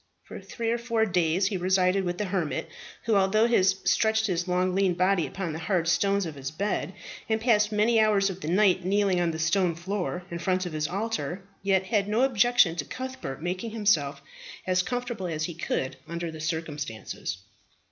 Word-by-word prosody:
For - - -9
three 230 -2 -3
or 235 - 0
four 230 -2 +1
days 180 -1 +1
he 200 - -2
resided 185 +1 +2
with 175 0 -2
the 210 - -1
hermit, 180 -5 -2 0.4
who, 230 - +1
although 200 +3 +4
he 235 -4 +3
stretched 220 +3 +2
his 180 -3 -1
long 180 0 +1
lean 190 -2 +2
body 185 -1 +2
upon 185 -5 -4
the 160 - -5
hard 170 -1 0
stones 200 +3 +2
of 160 - -5
his 135 -2 -5
bed, 195 +8 -2 0.4
and 220 0 +2
passed 215 -2 +3
many 220 +2 +3
hours 210 -2 +4
of 190 +1 -9
the - - -5
night 185 +1 +3
kneeling 195 -1 +2
on 170 - +1
the 160 - -3
stone 170 +2 +1
floor 180 0 -3
in 170 - -4
front 185 +1 0
of 175 - -5
his 155 -1 -1
alter, 200 -1 -3 0.2
yet 190 -1 +2
had 205 -1 +1
no 220 +4 +2
objection 240 -8 +4
to 145 - -2
Cuthbert 260 - -6
making 185 +6 -3
himself 205 -11 +1 0.4
as 185 0 +2
comfortable 240 -3 -3
as 155 -2 -3
he 170 - -3
could 145 -5 -3
under 170 0 -4
the 160 -1 -8
circumstances. 150 - -4
185 Hz, 195 wpm, -27 LUFS, 170-210 Hz, 0.4 s, although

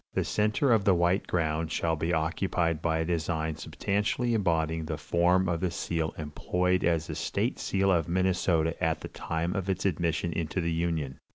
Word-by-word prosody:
The - - +2
center 110 +6 +1
of 110 -3 +4
the 95 -2 +4
white 85 +3 +1
ground 80 -2 -1
shall 80 0 0
be 80 +2 -1
occupied 85 0 0
by 80 -1 +1
a 80 - 0
design 80 -2 -1
substantially 105 +8 -1
embodying 80 -6 0
the 80 -1 -3
form 90 +4 +2
of 85 -1 0
the 90 +1 0
seal 80 -1 -2
employed 90 +4 0
as 85 -2 +2
the 80 - -5
state 100 - -2
seal 95 0 +1
of 85 -3 +1
Minnesota 90 -3 +1
at - - +1
the - - -6
time 85 +3 -3
of 95 -1 -2
its 95 0 -1
admission 85 -2 0
into 85 +2 -2
the 85 -1 0
Union.... 80 -5 -2
85 Hz, 185 wpm, -28 LUFS, 80-95 Hz, -, of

